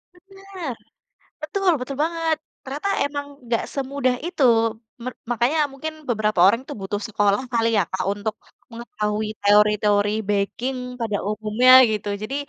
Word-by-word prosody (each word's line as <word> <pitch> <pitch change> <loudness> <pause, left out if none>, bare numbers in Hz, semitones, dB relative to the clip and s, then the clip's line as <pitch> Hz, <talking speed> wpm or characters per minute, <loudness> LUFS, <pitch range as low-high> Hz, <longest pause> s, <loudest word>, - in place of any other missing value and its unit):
Bener! 385 -5 -8 0.7
Betul, 365 +4 +1
betul 260 +2 -5
banget. 330 -1 0 0.3
Ternyata 290 +9 -4 0.2
emang 285 0 -4 0.2
nggak 230 -1 0
semudah 270 -2 -1
itu, 345 -5 -1 0.6
mer 255 - -4 0.2
makanya 245 +7 +1
mungkin 310 +4 -6 0.2
beberapa 215 -4 0
orang 230 +5 +3
tuh - - -5
butuh 195 +2 -3
sekolah 205 0 +1
kali 230 -1 +2
ya, 200 - +4
Kak, 190 0 -2
untuk 210 +1 -4 0.4
mengetahui 215 -2 -3
teori-teori 210 0 +4 0.2
baking 220 +6 -1 0.2
pada 210 -3 -1
umumnya 215 +4 +2 0.2
gitu. 210 -1 -3
Jadi 265 +6 -4
235 Hz, 135 wpm, -22 LUFS, 210-285 Hz, 0.7 s, ya